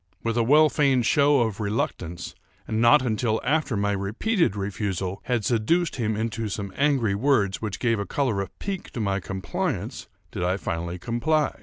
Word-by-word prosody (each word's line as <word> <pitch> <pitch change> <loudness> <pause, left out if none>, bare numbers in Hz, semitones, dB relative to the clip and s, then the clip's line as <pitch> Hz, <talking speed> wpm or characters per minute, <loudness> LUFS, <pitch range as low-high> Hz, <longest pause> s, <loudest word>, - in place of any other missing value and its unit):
With 115 0 -1
a 120 - +3
well 150 +7 +6
feigned 135 -5 +2
show 145 +1 +4
of 110 -3 -1
reluctance, 90 -5 -3 0.3
and 110 +1 -1
not 130 +4 +6
until 110 -1 0
after 145 -5 +1
my 100 0 +1
repeated 105 - 0
refusal 100 -2 -3
had 120 -5 0
seduced 145 +10 +1
him 110 -3 0
into 110 0 -2
some 100 -1 -5
angry 135 -8 +2
words 105 -3 +1
which 105 -3 -3
gave 115 -3 +1
a 100 - -3
color 125 -9 0
of 100 - -8
pique 195 -2 -5
to - - -4
my 100 -2 0
compliance, 95 0 -4 0.2
did - - -5
I 90 +2 +1
finally 85 -1 -3
comply. 120 - 0
110 Hz, 175 wpm, -25 LUFS, 100-135 Hz, 0.3 s, well